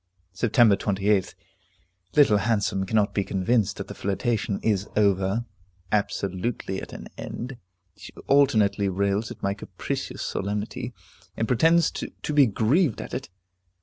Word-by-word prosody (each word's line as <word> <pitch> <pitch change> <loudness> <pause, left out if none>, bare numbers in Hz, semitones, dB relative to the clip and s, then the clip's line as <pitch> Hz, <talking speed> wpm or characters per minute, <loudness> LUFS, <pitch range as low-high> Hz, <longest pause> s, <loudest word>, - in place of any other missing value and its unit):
Sept. 110 +1 +4
28th. 100 -1 0 0.8
Little 140 -8 +6
Handsome 100 -3 0
cannot 105 0 +2
be 100 - +1
convinced 100 +2 0
that 100 - -6
the - - -7
flirtation 100 0 -1
is 100 -3 +1
over, 100 +2 +2 0.5
absolutely 100 0 -1
at - - -9
an - - -8
end. 125 +1 -6 0.4
She - - -11
alternately 110 -8 +3
rails 100 +3 0
at - - -10
my 100 - +1
capricious 100 - -5
solemnity, 105 +2 -3 0.5
and 115 - 0
pretends 165 +7 +4
to 150 - -5
be 145 -3 +6
grieved 120 - +2
at - - -7
it. - - -4
105 Hz, 130 wpm, -25 LUFS, 100-120 Hz, 0.8 s, Little